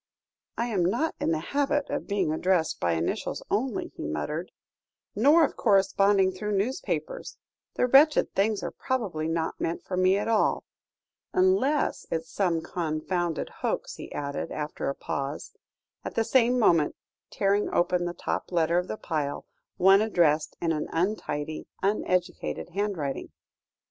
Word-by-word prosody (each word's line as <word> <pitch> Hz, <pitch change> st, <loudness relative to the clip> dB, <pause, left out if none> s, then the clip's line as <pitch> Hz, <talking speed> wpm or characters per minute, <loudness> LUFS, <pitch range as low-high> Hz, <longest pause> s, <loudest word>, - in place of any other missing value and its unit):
"I 235 Hz, -, 0 dB
am 210 Hz, -7 st, 0 dB
not 235 Hz, -, +1 dB
in -, -, 0 dB
the 165 Hz, -, +2 dB, 0.2 s
habit 285 Hz, 0 st, +1 dB
of -, -, -3 dB
being 195 Hz, -6 st, 0 dB
addressed 175 Hz, 0 st, +1 dB
by 85 Hz, -1 st, +1 dB
initials 80 Hz, +1 st, -2 dB
only," 230 Hz, +2 st, -1 dB
he -, -, -5 dB
muttered, 150 Hz, -, -3 dB, 0.6 s
"nor 295 Hz, +9 st, +6 dB
of -, -, -5 dB
corresponding 195 Hz, -2 st, +3 dB
through 210 Hz, +3 st, -4 dB
newspapers; 265 Hz, -, -3 dB, 0.4 s
the -, -, +2 dB
wretched 285 Hz, +5 st, +5 dB
things 205 Hz, +1 st, +1 dB
are -, -, -3 dB
probably 200 Hz, -12 st, -2 dB
not 165 Hz, 0 st, -2 dB
meant 165 Hz, -, -2 dB
for 185 Hz, -, -4 dB
me 185 Hz, +1 st, +4 dB
at 205 Hz, -, -2 dB
all 225 Hz, -2 st, +2 dB, 0.7 s
unless 370 Hz, -6 st, +2 dB
it's 165 Hz, 0 st, -3 dB
some 175 Hz, -5 st, +1 dB
confounded 170 Hz, 0 st, -2 dB
hoax," -, -, -2 dB
he -, -, -9 dB
added, 140 Hz, -1 st, -4 dB
after 150 Hz, -2 st, -3 dB
a 140 Hz, -, -3 dB
pause, 140 Hz, +2 st, -4 dB, 0.5 s
at -, -, -6 dB
the 225 Hz, -, +2 dB
same 245 Hz, +1 st, +3 dB
moment 170 Hz, -10 st, +3 dB, 0.3 s
tearing 200 Hz, +1 st, +1 dB
open 175 Hz, 0 st, +1 dB
the 175 Hz, 0 st, -4 dB
top -, -, -3 dB
letter 170 Hz, 0 st, +2 dB
of 180 Hz, -, -4 dB
the -, -, -4 dB
pile, 150 Hz, -6 st, -3 dB, 0.3 s
one 195 Hz, +2 st, +6 dB
addressed 170 Hz, -8 st, +2 dB
in 165 Hz, -, 0 dB
an 155 Hz, -1 st, -2 dB
untidy, 160 Hz, -4 st, -2 dB, 0.2 s
uneducated 185 Hz, -4 st, -1 dB
handwriting. 180 Hz, -7 st, -3 dB
185 Hz, 150 wpm, -27 LUFS, 160-215 Hz, 0.7 s, nor